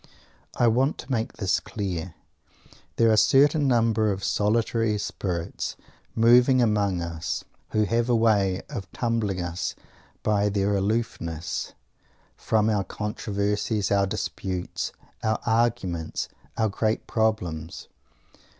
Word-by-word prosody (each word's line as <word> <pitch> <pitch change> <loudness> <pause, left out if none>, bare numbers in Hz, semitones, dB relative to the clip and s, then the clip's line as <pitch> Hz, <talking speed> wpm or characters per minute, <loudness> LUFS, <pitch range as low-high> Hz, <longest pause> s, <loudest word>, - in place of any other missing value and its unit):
I 120 - +4
want 130 +5 +2
to 125 - -8
make 115 -3 -1
this 95 -5 0
clear. 90 -4 -4 0.8
There 115 -1 +4
are - - +5
a - - +3
certain 145 +6 +5
number 115 -3 +3
of 95 0 -4
solitary 110 +1 +1
spirits 90 -4 -3 0.4
moving 125 +3 +6
among 105 -6 +2
us 85 -1 -3 0.3
who 110 - +2
have 115 +3 0
a 120 - +4
way 100 -5 +2
of 95 - -7
troubling 115 -6 -1
us 85 +1 -3 0.5
by 105 -1 +2
their 100 0 +1
aloofness 100 -6 -2 0.6
from 110 -1 +1
our 105 -3 +2
controversies, 105 +1 -2
our 100 -1 +3
disputes, 95 -1 -3 0.3
our 110 0 0
arguments, 110 -8 0 0.3
our 110 - +2
"great 110 +2 -1
problems." 90 -8 -1
105 Hz, 120 wpm, -26 LUFS, 95-115 Hz, 0.8 s, moving